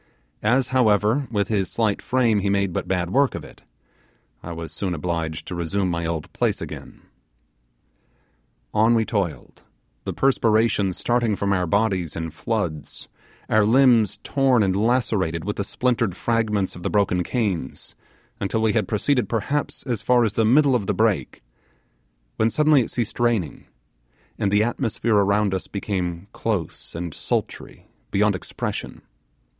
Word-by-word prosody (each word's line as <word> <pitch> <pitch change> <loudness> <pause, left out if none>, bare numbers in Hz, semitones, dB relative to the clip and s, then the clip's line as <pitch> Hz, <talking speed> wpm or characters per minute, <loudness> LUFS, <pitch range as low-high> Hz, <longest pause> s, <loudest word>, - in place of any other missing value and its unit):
As 125 +4 +2
however 120 +1 +2
with 100 -3 0
his 100 -4 0
slight 110 -3 0
frame 120 -5 +2
he 100 0 0
made 100 -2 +1
but - - -3
bad 90 -2 -1
work 140 +1 +2
of - - -6
it, - - -14 0.8
I 85 - -7
was 80 -1 -6
soon 95 -3 -2
obliged 80 -1 -3
to - - -6
resume 90 +2 -1
my 85 -1 -2
old 80 -2 -4
place - - 0
again. - - -9 1.7
On 110 +2 +4
we 110 -1 +2
toiled, 100 -9 -3 0.4
the - - -3
perspiration 110 -6 +2
starting 120 +1 +1
from 100 0 0
our 90 -2 0
bodies 95 -4 0
in 80 -1 -4
floods, 80 -2 -4 0.4
our 110 -1 +3
limbs 115 -2 +4
torn 135 -5 +2
and 95 -1 +1
lacerated 105 -7 0
with 105 - -3
the 100 - -1
splintered 115 -4 0
fragments 110 -4 0
of 90 - -10
the - - -2
broken 100 -3 +1
canes, 95 - -3 0.4
until 110 +3 -1
we 110 -2 +2
had 110 -5 +1
proceeded 125 +4 0
perhaps 140 +6 -2
as 120 -5 -3
far 125 -1 +3
as 105 - -1
the 115 - +2
middle 135 +5 +4
of 110 -6 0
the 105 - 0
brake, 110 - 0 0.9
when 110 - +3
suddenly 150 0 +4
it 115 - -3
ceased 120 -2 -3
raining, 115 -9 0 0.7
and 100 - +1
the 105 +1 +4
atmosphere 115 -2 0
around 100 0 +2
us 95 - -3
became 90 -3 -3
close 100 -9 -3
and 85 -1 -4
sultry - - -4 0.2
beyond - - +2
expression. - - -5
105 Hz, 155 wpm, -23 LUFS, 90-115 Hz, 1.7 s, On